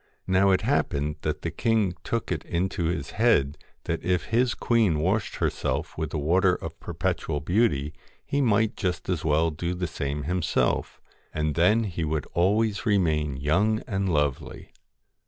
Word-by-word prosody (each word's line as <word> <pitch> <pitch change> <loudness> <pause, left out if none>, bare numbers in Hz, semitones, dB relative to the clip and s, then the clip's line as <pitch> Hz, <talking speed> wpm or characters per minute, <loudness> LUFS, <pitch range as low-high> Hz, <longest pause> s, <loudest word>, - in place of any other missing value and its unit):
Now 95 +1 +3
it 95 - +3
happened 75 +2 0
that - - -3
the - - -2
king 110 -5 +1
took 115 -4 -2
it 80 -4 -2
into 90 0 -2
his 85 +1 -2
head 100 - +2 0.3
that - - -3
if 90 -2 +1
his 120 +1 +3
queen 110 -9 +2
washed 95 +7 0
herself - - -2
with 80 -2 -3
the 80 - -3
Water 90 +5 +3
of - - -8
Perpetual 75 - -2
Beauty 75 -3 +1 0.3
he 140 - 0
might 110 -3 +2
just 90 -1 -3
as 90 -4 -1
well 80 +1 +2
do 85 +3 -3
the 90 0 -2
same 70 -2 -3
himself, 90 +2 0 0.4
and 75 -1 0
then 100 +8 +3
he 90 -5 -3
would 75 -2 -1
always 105 +4 +1
remain 80 - +1
young 100 +11 +1
and 95 -4 -1
lovely. 75 -4 -2
90 Hz, 160 wpm, -26 LUFS, 75-105 Hz, 0.4 s, Now